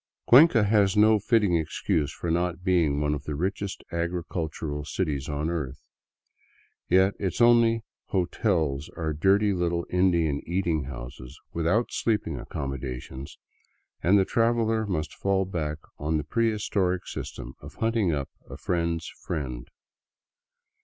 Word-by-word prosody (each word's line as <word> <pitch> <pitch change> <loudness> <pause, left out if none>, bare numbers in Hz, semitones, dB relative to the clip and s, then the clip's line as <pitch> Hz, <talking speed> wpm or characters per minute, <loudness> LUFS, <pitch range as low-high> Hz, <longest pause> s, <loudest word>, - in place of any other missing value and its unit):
Cuenca 130 -3 +7
has 105 -1 +3
no 110 0 +6
fitting 105 -3 +2
excuse 80 -1 0
for 85 - -4
not 90 +1 -1
being 85 -6 +2
one 75 0 +1
of 70 -1 -5
the 75 - -3
richest 95 +4 -3
agricul 85 -1 -2
tural 75 -1 -5
cities 75 -3 -2
on 75 +1 -2
earth. 75 -6 -3 1.1
Yet 95 +2 +4
its 95 -3 -2
only 115 -1 +5
" - - -67
hotels 85 - 0
" - - -22
are 80 -2 -1
dirty 100 +6 +3
little 85 -1 -1
Indian 85 -5 +2
eating 85 -4 0
houses 65 +1 -9
without 85 +8 +1
sleeping 110 -2 -1
accommodations, 65 -1 -6 0.6
and 95 +4 +4
the 95 - +3
traveler 115 -1 +1
must 80 -5 -2
fall 95 -1 0
back 80 -5 -3 0.2
on 75 +2 0
the 75 - -2
prehistoric 100 -2 0
system 60 - -7
of 70 - -11
hunting 115 -5 +1
up 70 -3 -3 0.2
a - - -8
friend's 85 -2 -1
friend. 65 -7 -4
85 Hz, 140 wpm, -26 LUFS, 75-100 Hz, 1.1 s, Cuenca